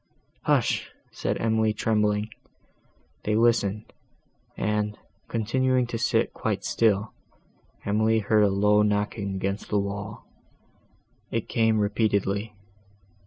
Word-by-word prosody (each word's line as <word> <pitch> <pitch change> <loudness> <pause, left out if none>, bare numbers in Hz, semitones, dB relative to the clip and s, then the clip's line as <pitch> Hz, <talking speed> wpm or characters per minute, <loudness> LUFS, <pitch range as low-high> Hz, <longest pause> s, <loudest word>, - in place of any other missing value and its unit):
"Hush!" - - +1 0.2
said - - -2
Emily, 110 -1 +2
trembling. 105 -1 +1 0.9
They 105 - 0
listened, 110 -2 +1 0.6
and, 105 0 -1 0.3
continuing 130 +3 +1
to 120 -1 -4
sit 115 - +1
quite - - -2
still, 110 -1 +1 0.7
Emily 110 +2 +2
heard 105 0 +3
a 100 - +4
low 105 +2 +3
knocking 105 -1 0
against 100 +2 -3
the 105 - +1
wall. 100 +1 -4 1.0
It - - -2
came 110 -1 +2
repeatedly. 105 0 0
105 Hz, 105 wpm, -26 LUFS, 105-110 Hz, 1.0 s, a